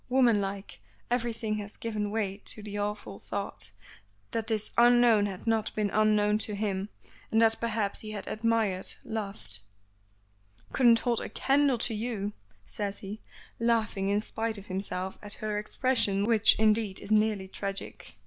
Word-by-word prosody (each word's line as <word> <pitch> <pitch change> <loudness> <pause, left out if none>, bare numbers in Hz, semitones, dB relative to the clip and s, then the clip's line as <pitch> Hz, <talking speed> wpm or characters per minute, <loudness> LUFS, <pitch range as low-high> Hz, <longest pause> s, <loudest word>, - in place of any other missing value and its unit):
Womanlike, 205 -6 +1 0.3
everything 230 -3 -1
has 205 0 -8
given 215 -2 -2
way 205 -2 -1
to 215 - -4
the 205 -1 -6
awful 205 - -3
thought, - - -3 0.6
that 225 -1 -2
this 215 -2 0
unknown 240 -3 +6
had 190 -2 -7
not 225 -1 0
been 210 -2 0
unknown 210 -1 +3
to 215 -1 0
him, 200 -1 -2 0.4
and 225 - +4
that 225 0 +4
perhaps 215 -3 -1
he 215 - -7
had 205 -2 -5
admired 220 -4 +1
loved 195 - -2 1.1
"Couldn't 235 -3 +5
hold 240 -2 +1
a - - -5
candle 275 -1 +2
to 230 0 0
you," 210 -2 -3 0.3
says 200 -1 -3
he, 205 +2 -7 0.4
laughing 225 -4 +1
in 205 +1 +2
spite 225 0 -3
of 200 - -10
himself 190 -1 -4
at 205 0 -2
her 210 -1 -2
expression 210 -3 +1
which, 225 -1 +5
indeed, 215 -2 +2
is 205 - -8
nearly 215 -3 +2
tragic. 195 - -6
215 Hz, 150 wpm, -29 LUFS, 200-225 Hz, 1.1 s, unknown